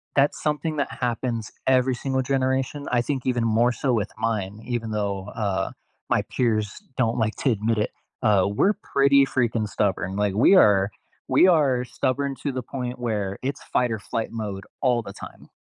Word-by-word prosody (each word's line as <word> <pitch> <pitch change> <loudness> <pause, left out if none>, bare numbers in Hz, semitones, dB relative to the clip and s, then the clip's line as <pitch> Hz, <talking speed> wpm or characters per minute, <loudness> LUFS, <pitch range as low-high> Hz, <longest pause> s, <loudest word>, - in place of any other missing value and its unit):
that's 140 +1 +3
something 155 +1 -1
that 140 - -1
happens 120 -2 -2 0.2
every 130 0 +3
single 130 +1 -1
generation. 130 +2 -1
I 125 -1 +3
think 130 0 -3
even 125 -2 +1
more 115 +2 +3
so 130 +1 0
with 105 -3 -1
mine, 110 -2 -2
even 115 -2 -3
though, 100 -2 -2
uh, 100 -4 -2 0.4
my - - +3
peers 110 - -1 0.2
don't 115 -3 +1
like 110 -2 0
to 140 - +1
admit 110 +1 0
it, 105 - 0 0.3
uh, 105 -4 +4
we're 105 - +2
pretty 140 -5 +3
freaking 120 -4 0
stubborn. 95 -2 -1
Like, 100 -1 0
we 115 - +5
are 100 - +5 0.4
we - - +6
are 140 -8 +3
stubborn 135 +3 -1
to 145 - 0
the 130 - -2
point 125 0 -5
where 105 -5 -2
it's 140 +2 -3
fight-or-flight 115 -2 -1
mode 105 -4 -5 0.2
all 125 -3 +2
the - - -9
time, - - -11
120 Hz, 175 wpm, -24 LUFS, 105-130 Hz, 0.4 s, we